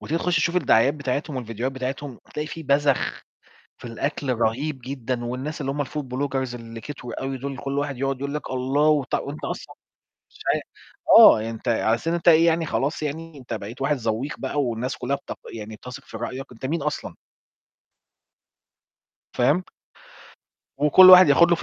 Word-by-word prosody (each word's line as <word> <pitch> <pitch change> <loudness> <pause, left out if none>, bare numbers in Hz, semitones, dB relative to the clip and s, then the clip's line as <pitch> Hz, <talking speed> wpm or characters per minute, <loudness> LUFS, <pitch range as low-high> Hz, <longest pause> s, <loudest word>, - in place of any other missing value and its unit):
وتيجي 165 +2 -2
تخش 180 0 0
تشوف 170 +3 +1
الدعايات 135 -3 +4
بتاعتهم 140 0 -3
والفيديوهات 120 +1 -4
بتاعتهم 130 0 -5 0.2
تلاقي 150 0 -3
في 165 +1 -7
بزخ 140 -1 +1 0.6
في - - -16
الأكل 135 +2 -2
رهيب 130 +6 -1
جدًا 130 -2 -4
والناس 130 +6 -4
اللي 135 -1 -2
هُم 145 0 -2
الfood 150 +3 -5
bloggers 130 -2 -2
اللي 115 -1 -9
كتروا 125 -1 -7
أوي 135 0 -3
دول، 135 +1 -5
كل 140 +2 -3
واحد 145 -3 -3
يقعد 135 -1 -1
يقول 140 +1 -4
لك 150 - -5
الله، 135 +4 +1
وطع 145 -3 +1
وأنت 145 +2 -7
أصلًا - - -6 0.6
مش - - -20 0.2
عا - - -1 0.6
آه، 110 +1 +7
أنت 115 +2 -7
على 115 -1 +2
أساس 115 +8 -4
إن 170 - +1
أنت 170 0 +1
إيه 165 0 +7
يعني 165 -1 +2
خلاص 145 +3 -1
يعني 155 +1 -5
أنت 120 -3 -6
بقيت 110 +4 -7
واحد 150 +1 +1
ذوّيق 115 +3 -3
بقى 145 - -1
والناس 125 +1 -2
كلها 140 +3 -2
بت 140 - -9 0.2
يعني 110 0 -7
بتثق 125 +3 -10
في 110 - -10
رأيك؟ 125 +3 -6
أنت 125 +2 -6
مين 160 +1 -2
أصلًا؟ 150 - -4 2.2
فاهم؟ 145 +9 +2 1.2
وكل 185 +6 +8
واحد 185 -3 +10
ياخد 170 +5 +6
له - - +6
في - - -7
135 Hz, 180 wpm, -24 LUFS, 125-150 Hz, 2.2 s, واحد